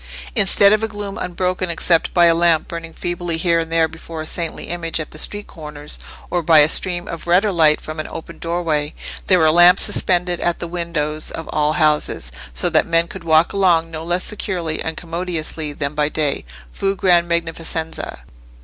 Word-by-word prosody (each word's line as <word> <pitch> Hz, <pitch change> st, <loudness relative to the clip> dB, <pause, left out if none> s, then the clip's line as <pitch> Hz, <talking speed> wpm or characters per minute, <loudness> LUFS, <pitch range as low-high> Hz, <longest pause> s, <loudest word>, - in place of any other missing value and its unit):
Instead 200 Hz, -1 st, +5 dB
of 215 Hz, -, +2 dB
a -, -, +1 dB
gloom 205 Hz, -2 st, -6 dB
unbroken 180 Hz, 0 st, -2 dB
except 170 Hz, 0 st, +1 dB
by 175 Hz, -1 st, +4 dB
a 170 Hz, -, +5 dB
lamp 165 Hz, -1 st, +2 dB
burning 165 Hz, -1 st, -7 dB
feebly 175 Hz, 0 st, -3 dB
here 170 Hz, 0 st, +2 dB
and 165 Hz, 0 st, -4 dB
there 165 Hz, -1 st, +3 dB
before 160 Hz, 0 st, -9 dB
a 155 Hz, -, -4 dB
saintly 165 Hz, 0 st, -3 dB
image 165 Hz, -1 st, -3 dB
at 155 Hz, -, -6 dB
the 155 Hz, -, -7 dB
street 205 Hz, +4 st, -3 dB
corners, 150 Hz, -3 st, -8 dB, 0.3 s
or 175 Hz, -, +1 dB
by 160 Hz, -1 st, +4 dB
a 150 Hz, 0 st, +6 dB
stream 175 Hz, 0 st, 0 dB
of 165 Hz, 0 st, -7 dB
redder 190 Hz, +4 st, +3 dB
light 155 Hz, -4 st, +4 dB
from 155 Hz, 0 st, -8 dB
an 155 Hz, -, -4 dB
open 165 Hz, -, -9 dB
doorway, 165 Hz, -3 st, -2 dB, 0.3 s
there 185 Hz, -, +5 dB
were 160 Hz, -2 st, +4 dB
lamps 175 Hz, +2 st, +7 dB
suspended 180 Hz, -1 st, +1 dB
at 175 Hz, -1 st, 0 dB
the 170 Hz, -, -6 dB
windows 165 Hz, -3 st, -2 dB
of 165 Hz, -, -7 dB
all 150 Hz, 0 st, +1 dB
houses, 150 Hz, -, +1 dB, 0.2 s
so -, -, +1 dB
that 160 Hz, -2 st, +2 dB
men 165 Hz, 0 st, +2 dB
could 185 Hz, 0 st, -9 dB
walk 160 Hz, 0 st, +3 dB
along 170 Hz, -4 st, +2 dB
no 160 Hz, 0 st, -6 dB
less 175 Hz, +2 st, -1 dB
securely 175 Hz, -6 st, -3 dB
and 160 Hz, 0 st, -4 dB
commodiously 165 Hz, -3 st, -3 dB
than 145 Hz, 0 st, -3 dB
by 150 Hz, 0 st, 0 dB
day,—fù 135 Hz, -, -3 dB
gran 175 Hz, -2 st, +3 dB
magnificenza. 165 Hz, -, -3 dB
165 Hz, 190 wpm, -19 LUFS, 155-175 Hz, 0.3 s, lamps